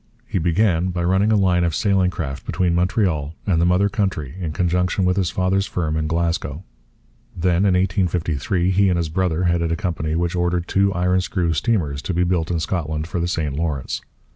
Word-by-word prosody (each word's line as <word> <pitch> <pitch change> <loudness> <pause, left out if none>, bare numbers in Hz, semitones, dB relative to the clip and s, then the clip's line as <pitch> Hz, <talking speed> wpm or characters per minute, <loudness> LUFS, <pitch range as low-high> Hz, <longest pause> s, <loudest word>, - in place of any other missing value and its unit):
He - - -2
began 90 +1 +2
by 90 -1 -2
running 95 +5 +2
a - - +4
line 90 -3 +3
of 85 -2 0
sailing 95 -4 +2
craft 70 -6 -5
between 90 -2 0
Montreal 85 -4 0
and 85 -5 +2
the 85 - +3
mother 90 +3 +3
country 95 - -2
in 85 -4 -3
conjunction 90 +3 0
with 90 0 +2
his 95 -4 +1
father's 95 +1 0
firm 80 -3 -2
in 80 0 -1
Glasgow. 85 -1 -2 0.7
Then, 90 +2 +2
in 95 - +3
1853, 90 -2 0
he 100 +1 +3
and 90 - +1
his 85 -2 -1
brother 90 0 0
headed 85 -2 +1
a - - +1
company 80 -3 -2
which 85 +1 -1
ordered 90 0 0
two 100 0 +2
iron 90 +1 +1
screw 90 -2 -1
steamers 80 -6 0
to 95 - -3
be 90 - +2
built 85 -2 0
in 85 -2 0
Scotland 80 -3 -2
for 90 +2 -3
the 85 - 0
St 75 -5 -2
Lawrence. 75 -4 -2
90 Hz, 200 wpm, -21 LUFS, 80-95 Hz, 0.7 s, a